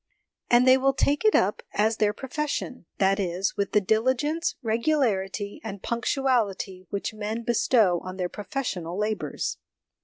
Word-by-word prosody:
And 240 +1 +5
they 260 +1 +7
will 270 0 +2
take 285 +1 +1
it 435 - +4
up 200 +3 +2
as 220 +2 +2
their 210 -1 +3
profession 265 - -4
that 195 +1 +2
is, 185 0 -1
with 200 -1 -1
the - - +4
SOME - - -14
PRELIMINARY 220 +6 +3
CONSIDERATIONS 310 +6 -1
3 225 - -1
diligence, 235 - -9
regularity, 200 -5 -1
and 200 -3 -7
punctuality 230 -7 -1
which 200 +2 -3
men 215 +2 -4
bestow 225 -6 +3
on 185 0 -7
their 180 -1 -1
professional 200 - -4
labours. 210 +1 -2
215 Hz, 165 wpm, -26 LUFS, 195-255 Hz, -, they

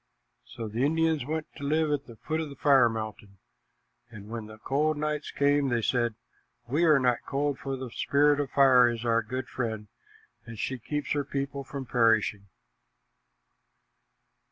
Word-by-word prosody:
So 115 - -6
the 115 +4 -2
Indians 160 -2 +1
went 155 0 -2
to 145 - -9
live 155 +2 +1
at 145 -1 -2
the 120 - -11
foot 155 +7 -3
of 155 - -5
the 140 - -10
fire 135 -6 +5
mountain, 110 -3 -6 0.7
and 105 -2 -11
when 115 -2 -6
the 110 0 -12
cold 145 +6 0
nights 150 0 -2
came, 140 -1 +2
they 120 -2 0
said, 120 -2 +1 0.5
"We 150 +8 +2
are 155 -3 +6
not 125 -3 +1
cold, 140 0 -1
for 135 -1 -4
the 130 -2 -7
Spirit 145 +3 +2
of 145 -2 -1
Fire 130 -3 +6
is 120 0 -4
our 115 0 +3
good 130 +3 -5
friend, 110 -4 -4 0.5
and 115 -1 -10
she 130 +4 -3
keeps 150 +5 -4
her 145 -1 +1
people 140 0 -4
from 135 -1 -7
perishing." 110 -4 +2
135 Hz, 170 wpm, -28 LUFS, 115-145 Hz, 0.7 s, are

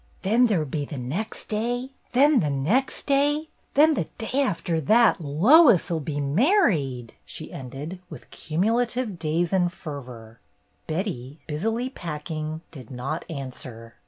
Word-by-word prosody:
"Then 230 +6 +4
there 205 -6 +2
'll 155 - -1
be 145 +1 -3
the 145 0 -7
next 145 - -4
day, 245 +4 -2 0.2
then 280 +2 +5
the 150 - 0
next 170 - 0
day, 290 +2 +2 0.3
then 310 +3 +6
the - - -1
day 255 +4 -1
after 170 -9 -1
that 220 - +4
Lois 195 - +5
'll 165 - 0
be 145 -1 -4
married! 145 - +2
" - - -41
she - - -8
ended, 140 +7 -7
with - - -11
cumu 175 +8 -1
lative 240 -5 -1
days 165 +3 0
and 180 -2 +2
fervor. 125 -9 -9 0.5
Betty, 155 - -3
busily 225 +11 -2
packing, 155 - -5
did 130 -7 -11
not 135 +6 -4
answer. 125 -6 -7
165 Hz, 150 wpm, -25 LUFS, 140-235 Hz, 0.5 s, then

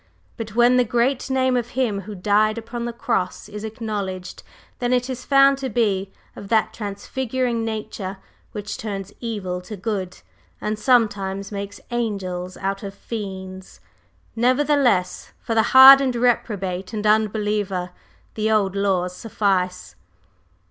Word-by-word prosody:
But 220 -3 -7
when 240 +1 +5
the 250 - +5
great 245 +4 0
Name 260 -1 +2
of 240 0 -3
Him 220 -7 0
who 205 +2 -8
died 210 +3 +2
upon 235 +1 -5
the 240 - -2
Cross 230 -6 -2
is 210 0 -7
acknowledged, 210 -5 -5 0.4
then 245 0 0
it 250 +1 0
is 255 0 -6
found 275 0 +5
to 265 -1 -3
be 200 -5 0 0.2
of 200 - -9
that 220 -1 +2
transfiguring 235 +3 -3
nature 210 -3 -5 0.3
which 210 -1 -5
turns 200 -2 -5
evil 195 -6 -4
to 205 +3 -8
good, 190 -3 -3 0.4
and 215 0 -3
sometimes 200 -5 +1
makes 200 0 -6
angels 185 -6 -3
out 195 0 -3
of 195 -1 -7
fiends. 190 -4 -7 0.6
Nevertheless, 255 -5 +2
for 230 - -3
the 225 - +4
hardened 265 0 +9
reprobate 195 -6 -1
and 215 -1 -3
unbeliever 210 -3 +1 0.4
the 215 0 -1
old 200 -3 +2
laws 185 -2 0
suffice." 185 -4 -1
215 Hz, 135 wpm, -22 LUFS, 195-240 Hz, 0.6 s, hardened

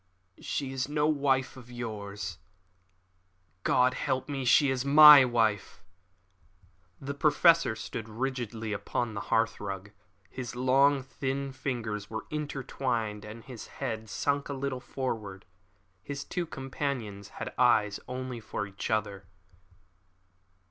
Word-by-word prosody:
"She 135 -2 -3
is 135 +1 -2
no 150 0 +1
wife 140 -4 +1
of 125 -2 -13
yours. 105 -6 -6 1.2
God 125 +5 +3
help 130 0 -2
me, 140 -3 -3
she 135 +3 +5
is 130 -1 -1
my 150 0 +10
wife." 115 -5 0 1.2
The 140 +1 -5
Professor 160 -1 +4
stood 110 0 -6
rigidly 115 -2 -3
upon 110 +3 -2
the 100 - -4
hearthrug. 105 -3 -1 0.4
His 125 +2 -7
long, 135 +2 +3
thin 135 +1 -3
fingers 110 -6 -4
were 110 0 -5
intertwined, 130 -7 -3
and 110 +2 -9
his 125 -4 -9
head 110 -5 -4
sunk 140 +4 -1
a - - -2
little 135 -1 -3
forward. 110 -8 -5 0.6
His 140 +6 -5
two 175 -2 -3
companions 130 -8 -4
had - - -5
eyes 110 -5 +3
only 125 -1 -5
for 110 -1 -4
each 100 +2 -6
other. 100 -3 -2
125 Hz, 120 wpm, -29 LUFS, 110-135 Hz, 1.2 s, my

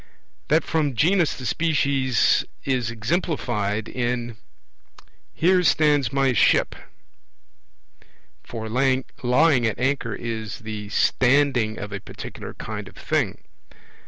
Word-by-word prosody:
That 155 +2 +3
from 150 -5 -1
genus 175 - +2
to 130 - -7
species 140 -5 +2 0.2
is 125 -4 -1
eXemplified 110 - -2
in 120 -1 -2 1.0
'Here 180 +2 +3
stands 150 -7 +3
my 135 -1 +2
ship'; - - +3 1.7
for 110 -2 -6
lying 130 +3 +1 0.6
at 110 - -2
anchor 130 -4 -1
is 110 -3 -5
the 105 -2 -6
'standing' 125 -2 +2
of 105 +1 -6
a 100 - -4
particular - - -9
kind - - -6
of - - -14
thing. - - -1
130 Hz, 105 wpm, -23 LUFS, 110-145 Hz, 1.7 s, That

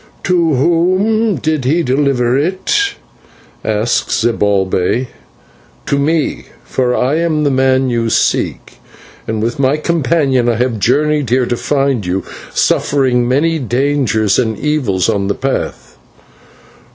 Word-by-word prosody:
"To 170 -4 +2
whom 185 - +1
did 155 -4 -1
he 160 +7 +1
deliver 130 -3 +1
it?" 190 - 0 0.7
asked 110 +2 0
Zibalbay. 105 +1 0 0.8
"To 140 - 0
me, 155 +1 -1 0.2
for 125 -1 -1
I 135 +5 +1
am 160 -3 0
the 145 - +2
man 130 0 +2
you 115 -1 0
seek, - - -1 0.5
and 110 -1 -2
with 120 +3 -2
my 135 +2 +2
companion 150 -6 +1
I 115 - +1
have 120 -1 -1
journeyed 150 +4 +1
here 125 +1 +2
to 120 - -1
find 135 -3 0
you, 90 +1 -2 0.3
suffering 130 -4 +1
many 160 +6 +1
dangers 125 -5 +1
and 110 -4 -1
evils 120 - 0
on 100 -1 0
the 100 - -1
path." 135 +1 -4
130 Hz, 125 wpm, -15 LUFS, 120-150 Hz, 0.8 s, To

